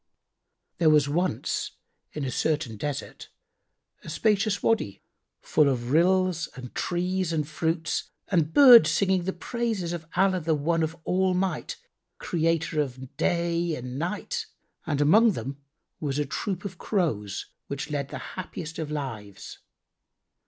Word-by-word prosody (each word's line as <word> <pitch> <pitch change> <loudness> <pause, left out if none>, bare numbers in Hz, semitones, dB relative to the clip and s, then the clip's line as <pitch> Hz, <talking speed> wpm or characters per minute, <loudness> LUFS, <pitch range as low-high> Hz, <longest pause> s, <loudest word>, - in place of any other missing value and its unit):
There 165 -3 +5
was 150 -2 +5
once, 165 -3 -1 0.4
in 150 -2 -3
a 130 - -2
certain 150 -7 -1
desert, 145 +6 -5 0.7
a - - -8
spacious 205 +5 +1
Wady, 215 - 0 0.4
full 150 -2 +3
of 120 -2 -2
rills 180 +1 +3
and 125 -2 -9
trees 180 0 -1
and 155 -3 -1
fruits 160 +1 -1 0.2
and 165 -5 +1
birds 250 - +9
singing 190 -3 +2
the 190 - 0
praises 215 -3 -2
of 165 -2 -6
Allah 190 0 +3
the 160 -1 +1
One 165 +3 0
of 160 +1 -2
All 185 +1 +1
might, 185 -3 -2 0.4
Creator 165 -2 0
of 130 -1 -6
day 170 0 0
and 125 +1 -6
night; 210 - -3 0.4
and 145 -2 0
among 215 +9 +6
them 135 -2 -6 0.4
was 145 -4 -2
a 150 - +1
troop 180 +7 -3
of 185 -3 -6
Crows, 130 - -1 0.2
which 140 +2 -5
led 140 -2 -2
the - - -5 0.2
happiest 170 -3 -6
of 155 -2 -3
lives. 115 -10 -6
165 Hz, 140 wpm, -26 LUFS, 145-185 Hz, 0.7 s, birds